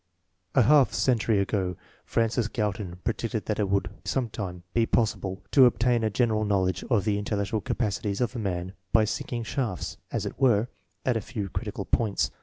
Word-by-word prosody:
A 130 - +6
half 140 +3 +5
century 115 -4 +2
ago 95 -2 0 0.3
Francis 115 0 +1
Galton 105 -5 -2
predicted 115 -1 -2
that 105 - -2
it 100 -2 +1
would 100 -1 +1
sometime 105 -8 -3
be 115 -1 +2
possible 100 -4 0
to 130 -3 +8
obtain 120 +1 +2
a 110 - +2
general 110 0 +1
knowl 100 -3 +2
edge 95 -1 -2
of 110 -6 +2
the 105 -2 +1
intellectual 105 0 -1
capacities 100 -3 -1
of 125 +1 0
a - - -2
man 95 -3 -3 0.2
by 110 -1 +5
sinking 120 +1 -3
shafts, 110 -5 -3
as - - -2
it - - -6
were, 120 -4 +3 0.4
at 125 -3 +2
a - - -2
few 100 -1 -5
critical - - -4
points. 110 -4 +1
110 Hz, 180 wpm, -27 LUFS, 100-120 Hz, 0.4 s, to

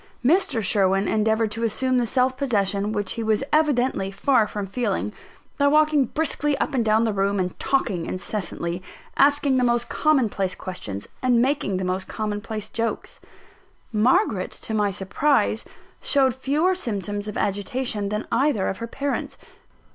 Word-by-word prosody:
Mr. 315 - +2
Sherwin 195 0 +2
endeavoured 220 0 +1
to 225 +2 -3
assume 255 +3 +1
the 240 - 0
self 255 +2 +2
possession 205 -6 0
which 205 -3 -2
he 230 - -3
was 220 +2 +1
evidently 265 -10 +2
far 215 +3 +2
from 205 -1 -4
feeling, 210 0 -2 0.5
by 285 - +4
walking 300 -1 +4
briskly 295 +1 -1
up - - -1
and 250 -3 +2
down 220 +1 +3
the 225 -2 0
room, 200 +1 0
and 180 -1 -3
talking 205 -11 0
incessantly 180 -2 -3 0.3
asking 285 -1 +4
the 250 - +2
most 240 0 +1
common 300 -6 +2
place 195 -2 -2
questions, 105 - -6
and 250 -2 +3
making 250 -7 +1
the 185 - -2
most 185 +1 -2
common 210 -1 -3
place 215 -1 -6
jokes. 230 0 -3 0.7
Margaret, 215 -3 +2
to 220 - -6
my 210 -1 +2
surprise, 200 +10 +1 0.4
showed 265 -3 +3
fewer 295 +8 +1
symptoms 205 - -3
of 210 - -5
agitation 205 +1 -1
than 210 +1 -3
either 265 -7 +2
of 195 - -4
her 230 - -4
parents. 280 +4 -3
220 Hz, 160 wpm, -23 LUFS, 200-265 Hz, 0.7 s, by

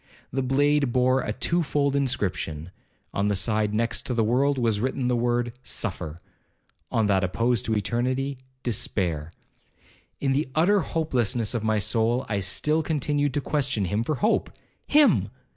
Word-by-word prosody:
The 135 - 0
blade 140 +1 +2
bore 130 +1 +3
a - - -3
two 170 +10 0
fold 140 -2 0
inscription—on 95 - -3
the 105 - +1
side 105 +1 +1
next 115 +2 -1
the 115 - +2
world 135 +5 +2
was 115 -4 +1
written 130 +2 -1
the 125 - +2
word 120 0 0
'suffer,'—on 90 +2 -5
that 100 -2 +2
opposed 115 +5 0
to 110 - 0
eternity, 130 +5 -1 0.2
despair.' 85 -8 -1 0.9
In 135 - 0
the 135 0 0
utter 190 +6 +4
hopelessness 125 - 0
of 115 -3 -2
my 110 -1 +1
soul, 115 +4 +1
I 100 -2 -1
still 150 +11 +1
continued 145 -2 0
to 145 - +1
question 135 -8 0
him 105 +5 0
for 155 +5 -1
hope—him! 280 - +1
120 Hz, 145 wpm, -25 LUFS, 105-140 Hz, 0.9 s, utter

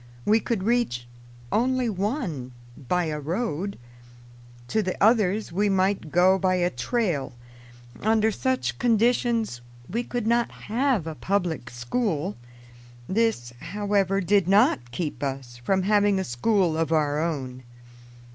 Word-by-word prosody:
We 220 +2 +4
could 225 -5 -2
reach 220 - 0 0.4
only 255 +2 +1
one 190 - -3 0.3
by 180 +4 +2
a 155 -1 -3
road; 185 - -3 0.9
to 220 - +1
the 185 -3 -3
others 215 -2 +3
we 205 +4 +1
might 190 -4 +1
go 185 +2 +4
by 185 0 +2
a 175 0 +1
trail. 145 - -1 0.7
Under 220 +1 +3
such 260 +4 -1
conditions 230 - +1 0.3
we 235 +5 -2
could 245 -2 -3
not 235 +1 +2
have 240 - -1
a 160 - -4
public 175 -6 -2
school. 155 - -2 0.7
This, 195 - 0
however, 200 0 0
did 195 0 +2
not 195 - +3
keep 150 +5 -4
us 135 -3 -4
from 185 +11 0
having 205 0 +3
a 190 - 0
school 180 - +1
of 160 -1 -1
our 150 -2 +2
own. 130 -6 -3
190 Hz, 130 wpm, -25 LUFS, 155-220 Hz, 0.9 s, We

